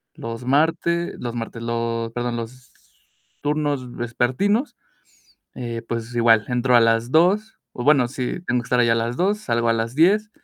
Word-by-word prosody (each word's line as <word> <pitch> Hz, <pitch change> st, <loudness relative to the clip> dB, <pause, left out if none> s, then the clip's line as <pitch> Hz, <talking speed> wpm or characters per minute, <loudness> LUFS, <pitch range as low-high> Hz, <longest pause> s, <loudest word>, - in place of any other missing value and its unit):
Los 115 Hz, +1 st, -7 dB
martes, 165 Hz, +5 st, +1 dB
los 120 Hz, -1 st, -5 dB
martes, 115 Hz, 0 st, -6 dB
los 115 Hz, 0 st, -2 dB
perdón, 120 Hz, 0 st, -3 dB
los 120 Hz, +2 st, -8 dB, 0.7 s
turnos 145 Hz, -4 st, -2 dB
vespertinos, 130 Hz, -, 0 dB, 0.8 s
eh, 120 Hz, -2 st, -5 dB
pues 115 Hz, +1 st, -5 dB
igual, 115 Hz, -2 st, +4 dB
entro 125 Hz, 0 st, +2 dB
a -, -, +6 dB
las 115 Hz, +1 st, +2 dB
2:00, 195 Hz, +8 st, +2 dB
o 125 Hz, -, -6 dB
bueno, 140 Hz, -5 st, +4 dB
sí, 130 Hz, +5 st, -4 dB
tengo 125 Hz, 0 st, 0 dB
que -, -, -13 dB
estar 125 Hz, -, +1 dB
ahí 120 Hz, -, +3 dB
a 115 Hz, -, +4 dB
las 115 Hz, +1 st, -2 dB
2:00, 200 Hz, +6 st, +1 dB
salgo 120 Hz, -, -1 dB
a -, -, +4 dB
las 115 Hz, +1 st, -2 dB
10:00. 205 Hz, +6 st, +3 dB
120 Hz, 175 wpm, -22 LUFS, 115-150 Hz, 0.8 s, a